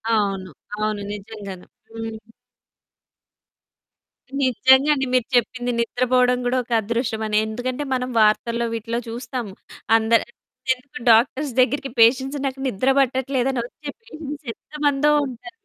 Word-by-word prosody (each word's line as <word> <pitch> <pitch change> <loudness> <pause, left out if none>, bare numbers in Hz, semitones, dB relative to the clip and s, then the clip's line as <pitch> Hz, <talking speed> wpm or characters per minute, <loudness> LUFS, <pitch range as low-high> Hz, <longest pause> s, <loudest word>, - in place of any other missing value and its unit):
అవును. 195 -3 -1 0.3
అవును. 215 -1 -2
నిజంగాను. 200 -3 -8 0.3
హ్మ్. 225 -1 -5 2.2
నిజంగా 260 +3 +4
అండి. 270 -2 -1
మీరు 250 -2 +3
చెప్పింది 245 +1 +1
నిద్రపోవడం 250 +1 +2
గూడా 250 +1 +1
ఒక 240 - -19
అదృష్టమని. 220 -1 -1
ఎందుకంటే 245 +5 -3
మనం 255 0 -1
వార్తల్లో 235 +2 +2
వీటిలో 230 +1 -2
చూస్తాము. 235 -3 -5 0.4
అందరి 225 +1 +2 0.5
ఎందుకు 255 +1 -12
డాక్టర్స్ 260 +5 +3
దగ్గరికి 270 +2 +2
పేషెంట్స్ 265 +5 +4
నాకు 270 0 -3
నిద్ర 255 +3 0
పట్టట్లేదని 265 -1 +1
వచ్చే 290 +4 -9
పేషెంట్స్ 305 - -8
ఎంతమందో 295 -1 0 0.2
ఉంటారు? 255 +8 -9
245 Hz, 110 wpm, -22 LUFS, 225-265 Hz, 2.2 s, నిజంగా